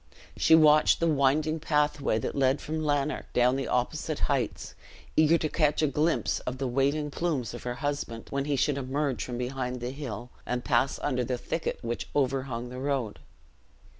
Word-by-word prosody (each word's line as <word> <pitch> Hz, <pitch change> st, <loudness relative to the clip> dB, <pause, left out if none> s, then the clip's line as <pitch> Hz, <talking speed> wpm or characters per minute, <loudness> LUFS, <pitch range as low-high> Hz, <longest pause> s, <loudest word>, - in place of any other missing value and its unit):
She 160 Hz, -, +5 dB
watched 155 Hz, -1 st, +5 dB
the 170 Hz, -, +1 dB
winding 155 Hz, +2 st, +2 dB
pathway 150 Hz, -5 st, +1 dB
that 110 Hz, -, -3 dB
led 135 Hz, 0 st, +2 dB
from 155 Hz, +2 st, -4 dB
Lanark 145 Hz, -1 st, -1 dB
down 125 Hz, +1 st, +3 dB
the 135 Hz, -1 st, -2 dB
opposite 150 Hz, +5 st, -1 dB
heights, 135 Hz, -6 st, -1 dB, 0.4 s
eager 155 Hz, +2 st, +5 dB
to 155 Hz, -, -1 dB
catch 150 Hz, -1 st, +1 dB
a -, -, +4 dB
glimpse 150 Hz, +4 st, +1 dB
of 125 Hz, +1 st, -5 dB
the 135 Hz, 0 st, -2 dB
waving 140 Hz, +4 st, 0 dB
plumes 140 Hz, -9 st, -2 dB
of 120 Hz, -, -7 dB
her 125 Hz, 0 st, -4 dB
husband 140 Hz, -4 st, -3 dB
when 140 Hz, 0 st, -1 dB
he 145 Hz, -1 st, 0 dB
should 140 Hz, +1 st, +1 dB
emerge 135 Hz, 0 st, -1 dB
from 120 Hz, -1 st, -5 dB
behind 125 Hz, 0 st, -3 dB
the 120 Hz, +1 st, -4 dB
hill, 125 Hz, -4 st, -6 dB
and 125 Hz, 0 st, -3 dB
pass 130 Hz, 0 st, +2 dB
under 125 Hz, -3 st, 0 dB
the 125 Hz, +1 st, -2 dB
thicket 160 Hz, +6 st, -3 dB
which 120 Hz, 0 st, -4 dB
overhung 130 Hz, -3 st, -1 dB
the 125 Hz, +1 st, -7 dB
road. 130 Hz, -, -2 dB
135 Hz, 180 wpm, -28 LUFS, 125-150 Hz, 0.4 s, She